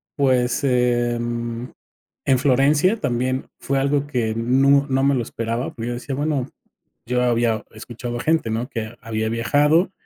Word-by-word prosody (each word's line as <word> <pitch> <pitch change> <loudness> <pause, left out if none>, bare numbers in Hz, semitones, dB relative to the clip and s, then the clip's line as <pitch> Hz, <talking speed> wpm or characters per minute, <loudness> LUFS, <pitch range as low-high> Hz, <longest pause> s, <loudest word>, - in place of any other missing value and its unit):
pues, 130 -1 +1
en 120 -1 0 0.5
en 130 -2 +3
Florencia 145 - +3
también 130 +2 -1
fue 140 0 -1
algo 140 +1 +1
que 120 -6 -1
nu 135 +4 +3
no 135 0 +1
me 140 +1 +4
lo 125 - +1
esperaba, 115 +3 -3
porque 115 0 -5
yo - - -2
decía, 125 +3 -5
bueno, 145 -2 -1 0.6
yo 125 +1 0
había 115 -2 +1
escuchado 120 +2 -6
a - - -4
gente, 160 -7 +1
¿no? 115 +4 -2
Que 115 -3 -5
había 110 -1 -2
viajado, 145 - +2
125 Hz, 155 wpm, -22 LUFS, 120-140 Hz, 0.6 s, me